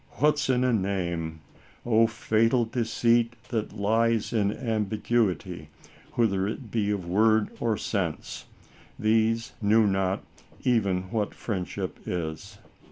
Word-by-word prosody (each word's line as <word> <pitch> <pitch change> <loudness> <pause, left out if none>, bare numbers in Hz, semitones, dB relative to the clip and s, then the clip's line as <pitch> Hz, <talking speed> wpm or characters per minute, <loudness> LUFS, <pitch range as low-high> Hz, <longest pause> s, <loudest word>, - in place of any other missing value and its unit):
" - - -29
What's 150 -2 +3
in 125 -1 +3
a 125 -1 +2
name? 85 -6 -2 0.2
" - - -28
O 115 -1 +4
fatal 115 +2 +2
deceit 115 0 +1 0.2
that 110 -3 -2
lies 115 +2 +1
in 105 -3 +2
ambiguity, 110 - -1 0.4
whether 100 -5 +1
it 110 0 -6
be 105 -3 0
of 100 -4 -1
word 110 +3 +3
or 115 -3 0
sense! 95 -9 -3 0.5
These 115 +1 +1
knew 110 +1 +4
not 95 -1 0 0.4
even 100 -7 +2
what 110 -3 -1
friendship 95 -6 -4
is. 90 +5 -4
110 Hz, 125 wpm, -27 LUFS, 100-115 Hz, 0.5 s, O